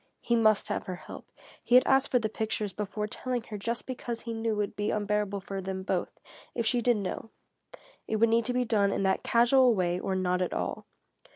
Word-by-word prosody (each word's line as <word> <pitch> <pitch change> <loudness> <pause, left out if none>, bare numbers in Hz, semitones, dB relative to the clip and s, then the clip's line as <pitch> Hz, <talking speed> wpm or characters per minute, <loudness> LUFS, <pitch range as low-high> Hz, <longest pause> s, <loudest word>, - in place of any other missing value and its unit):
He 235 - +1
must 215 -2 +3
have - - -3
her 185 - -3
help. - - -11 0.4
He 245 - +3
had 255 - +7
asked 270 0 +3
for 250 - +3
the 225 -3 0
pictures 215 -2 -3
before 210 0 -3
telling 245 +2 -3
her 215 -2 -7
just 230 +4 -3
because 240 -2 -5
he 230 - -5
knew 225 0 -1
it - - -2
would 205 -1 -2
be 205 0 -1
unbearable 205 -1 -1
for 195 0 -5
them 190 0 -4
both, - - -2 0.4
if 235 - -1
she 240 +2 +2
did 240 -1 +3
know. 205 +2 -4 0.8
It 220 - -1
would 225 +1 +4
need 230 0 +2
to 250 - +1
be 250 0 +1
done 205 -3 +2
in 195 - -1
that 190 0 +2
casual 240 +1 +4
way 180 -2 0
or 190 0 -2
not 180 -1 0
at 180 - -1
all. - - -3
215 Hz, 225 wpm, -29 LUFS, 195-235 Hz, 0.8 s, had